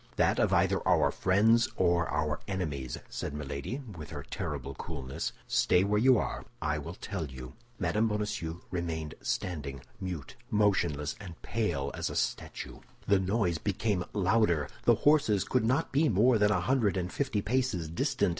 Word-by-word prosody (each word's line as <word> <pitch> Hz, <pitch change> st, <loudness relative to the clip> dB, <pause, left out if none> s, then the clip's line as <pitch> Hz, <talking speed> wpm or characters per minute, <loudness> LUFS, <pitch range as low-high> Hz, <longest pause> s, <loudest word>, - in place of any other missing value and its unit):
"That -, -, +2 dB
of -, -, +3 dB
either -, -, +3 dB
our -, -, +4 dB
friends 110 Hz, +5 st, +3 dB
or 85 Hz, -2 st, +2 dB
our 80 Hz, -1 st, 0 dB
enemies," 75 Hz, -10 st, -3 dB
said 70 Hz, -, -5 dB
Milady, 75 Hz, -, -4 dB
with 75 Hz, -3 st, -8 dB
her 75 Hz, -2 st, -6 dB
terrible 75 Hz, -7 st, -4 dB
coolness. 70 Hz, -3 st, -4 dB
"Stay 90 Hz, -, +3 dB
where 105 Hz, +1 st, +2 dB
you 130 Hz, +2 st, +6 dB
are, -, -, -2 dB, 0.2 s
I 75 Hz, 0 st, -1 dB
will 85 Hz, +4 st, -7 dB
tell 95 Hz, -6 st, -4 dB
you." 65 Hz, -1 st, -9 dB, 0.2 s
Mme. 105 Hz, +5 st, +1 dB
Bonacieux 105 Hz, -6 st, -3 dB
remained 80 Hz, -4 st, -3 dB
standing, 70 Hz, -7 st, -3 dB, 0.2 s
mute, 90 Hz, -, -5 dB
motionless, 95 Hz, -, +2 dB
and 90 Hz, -4 st, -9 dB
pale 85 Hz, -12 st, -1 dB
as -, -, -2 dB
a -, -, -6 dB
statue. -, -, -3 dB, 0.3 s
The 100 Hz, -1 st, +5 dB
noise 95 Hz, -3 st, +1 dB
became 100 Hz, -1 st, 0 dB
louder; 95 Hz, -6 st, +2 dB, 0.2 s
the -, -, +6 dB
horses 140 Hz, -10 st, +4 dB
could 125 Hz, +1 st, +1 dB
not 125 Hz, +4 st, +1 dB
be 150 Hz, +3 st, +3 dB
more 115 Hz, +4 st, +4 dB
than 105 Hz, 0 st, +4 dB
a 105 Hz, -, +2 dB
hundred 120 Hz, -7 st, +2 dB
and 90 Hz, 0 st, -2 dB
fifty 110 Hz, -8 st, -1 dB
paces 110 Hz, -7 st, 0 dB
distant. 80 Hz, +2 st, 0 dB
95 Hz, 165 wpm, -30 LUFS, 75-105 Hz, 0.3 s, you